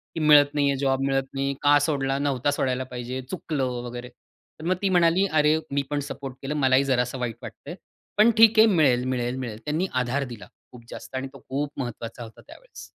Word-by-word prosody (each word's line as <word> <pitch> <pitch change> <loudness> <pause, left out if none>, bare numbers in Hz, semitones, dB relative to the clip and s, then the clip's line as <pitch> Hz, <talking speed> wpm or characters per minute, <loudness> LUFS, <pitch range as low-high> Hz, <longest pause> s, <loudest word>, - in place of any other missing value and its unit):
की 165 - -3
मिळत 150 -2 +5
नाही 145 -1 +2
आहे, 140 - 0
जॉब 135 -1 0
मिळत 135 0 +1
नाही. 140 0 -1
का 145 0 +5
सोडला 135 -2 -1
नव्हता 140 -1 0
सोडायला 130 -2 -1
पाहिजे, 125 +1 -5
चुकलं 155 -6 -3 0.2
वगैरे. 120 +1 -7
तर 155 +5 -18
मग 185 +2 +1
ती 195 - +1
म्हणाली, 175 +1 +3
"अरे! 155 0 +3
मी 140 0 +1
पण 145 -1 -1
सपोर्ट 135 -2 -7
केलं 145 +2 -4
मलाही 135 -1 +3
जरासं 125 -1 -1
वाईट 120 -3 -3
वाटतं - - -10
आहे, - - -6 0.4
पण 220 +3 +6
ठीक 225 -1 +6
आहे 225 - +8
मिळेल, 140 - +3
मिळेल, 125 -1 -2
मिळेल." 115 -4 -6
त्यांनी 155 +5 -1
आधार 130 +3 -1
दिला 100 -5 -11 0.2
खूप 120 -2 -14
जास्त - - -9
आणि 130 +1 -3
तो 135 - -12
खूप 140 +2 -2
महत्वाचा 120 -1 -6
होता 110 - -13
त्यावेळेस. - - -13
135 Hz, 210 wpm, -25 LUFS, 125-150 Hz, 0.4 s, आहे